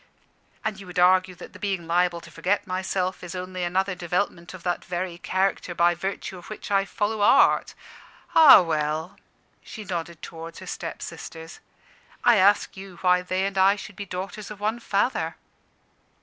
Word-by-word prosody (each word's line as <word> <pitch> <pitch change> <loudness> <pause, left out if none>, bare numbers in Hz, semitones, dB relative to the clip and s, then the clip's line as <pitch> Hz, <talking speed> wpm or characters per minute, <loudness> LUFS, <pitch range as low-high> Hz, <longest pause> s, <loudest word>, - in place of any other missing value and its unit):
"And 215 -3 -2
you 195 - -11
would 180 +1 -9
argue 185 +1 +4
that - - -12
the - - -12
being 195 -4 -2
liable 170 0 +1
to - - -13
forget 200 +3 0
myself 185 0 -2
is 180 +1 -7
only 185 0 -4
another 185 +2 0
development 175 -1 -2
of 175 - -12
that 175 -1 -1
very 175 -1 -4
character 185 -1 -1
by 170 +1 +4
virtue 190 +1 -5
of 175 - -13
which 215 -1 -8
I 195 -1 +3
follow 210 +1 -2
Art. 205 - +4 0.6
Ah, 305 - +9
well" 155 +1 -2 0.4
she 215 - -9
nodded 170 -3 -5
towards 165 0 -8
her - - -9
stepsisters 160 0 -7 0.6
"I 240 -2 +6
ask 200 +2 +3
you 190 -2 -10
why 180 -1 +4
they 185 +1 -1
and 195 -1 -2
I 195 +2 +5
should 205 0 -10
be 200 0 -7
daughters 195 +3 -6
of 210 -1 -9
one 215 +3 -1
father?" 195 -7 0
185 Hz, 170 wpm, -25 LUFS, 175-195 Hz, 0.6 s, Ah